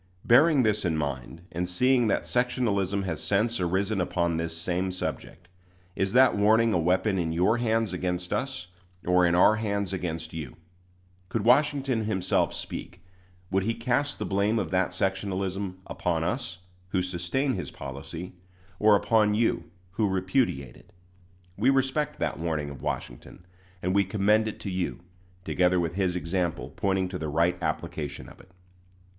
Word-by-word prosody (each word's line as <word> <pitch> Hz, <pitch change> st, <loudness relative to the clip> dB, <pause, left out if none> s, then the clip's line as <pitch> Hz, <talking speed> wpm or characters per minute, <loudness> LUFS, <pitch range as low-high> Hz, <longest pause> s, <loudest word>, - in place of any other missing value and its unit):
Bearing 140 Hz, +3 st, +6 dB
this 105 Hz, -1 st, +1 dB
in 85 Hz, -4 st, 0 dB
mind, 70 Hz, +2 st, -4 dB
and 90 Hz, +1 st, -2 dB
seeing 125 Hz, +5 st, +3 dB
that -, -, +1 dB
sectionalism 105 Hz, -6 st, 0 dB
has 80 Hz, -5 st, -3 dB
since 110 Hz, +3 st, +1 dB
arisen 95 Hz, +3 st, 0 dB
upon 85 Hz, -1 st, 0 dB
this 80 Hz, 0 st, -3 dB
same 90 Hz, +2 st, -1 dB
subject, 90 Hz, -1 st, -5 dB, 0.5 s
is 95 Hz, +1 st, -1 dB
that 130 Hz, +1 st, +6 dB
warning 110 Hz, +2 st, +4 dB
a 90 Hz, -, +2 dB
weapon 95 Hz, +4 st, +1 dB
in 80 Hz, -2 st, -1 dB
your 95 Hz, +8 st, +2 dB
hands 115 Hz, -4 st, +1 dB
against 90 Hz, 0 st, -2 dB
us, 130 Hz, -8 st, -2 dB, 0.4 s
or 90 Hz, 0 st, +4 dB
in 85 Hz, -, +2 dB
our 105 Hz, +4 st, +5 dB
hands 100 Hz, -3 st, -2 dB
against 80 Hz, -3 st, -4 dB
you? 75 Hz, -6 st, -6 dB, 0.7 s
Could 105 Hz, +1 st, -1 dB
Washington 135 Hz, -2 st, +3 dB
himself 95 Hz, -4 st, +1 dB
speak, -, -, -7 dB, 0.5 s
would 95 Hz, 0 st, +2 dB
he 115 Hz, +4 st, -1 dB
cast 125 Hz, +5 st, 0 dB
the -, -, -3 dB
blame 100 Hz, +3 st, +1 dB
of 95 Hz, -6 st, -2 dB
that 95 Hz, -1 st, +2 dB
sectionalism 95 Hz, 0 st, -2 dB
upon 85 Hz, -2 st, -1 dB
us, 95 Hz, 0 st, -2 dB, 0.3 s
who 90 Hz, 0 st, 0 dB
sustain 90 Hz, +10 st, -1 dB
his 90 Hz, -, -4 dB
policy, 70 Hz, +6 st, -7 dB, 0.5 s
or 105 Hz, -1 st, +6 dB
upon 105 Hz, 0 st, +3 dB
you, 115 Hz, -5 st, 0 dB, 0.2 s
who 105 Hz, +2 st, 0 dB
repudiate 95 Hz, -, 0 dB
it? -, -, -20 dB, 0.6 s
We 115 Hz, +6 st, +3 dB
respect 135 Hz, +2 st, +1 dB
that -, -, -2 dB
warning 80 Hz, -3 st, -2 dB
of 70 Hz, -, -10 dB
Washington, -, -, -6 dB, 0.4 s
and 90 Hz, +1 st, +1 dB
we 100 Hz, 0 st, +4 dB
commend 105 Hz, +2 st, +2 dB
it 110 Hz, -, -5 dB
to 100 Hz, -, -4 dB
you, 90 Hz, -1 st, -2 dB, 0.4 s
together 90 Hz, 0 st, +2 dB
with 85 Hz, -1 st, -1 dB
his 95 Hz, -1 st, 0 dB
example 85 Hz, -6 st, -2 dB
pointing 95 Hz, -2 st, 0 dB
to 90 Hz, -1 st, -5 dB
the 80 Hz, -, -3 dB
right 85 Hz, +4 st, +2 dB
application 75 Hz, -3 st, -4 dB
of -, -, -16 dB
it. 95 Hz, -, -21 dB
95 Hz, 160 wpm, -27 LUFS, 85-110 Hz, 0.7 s, Bearing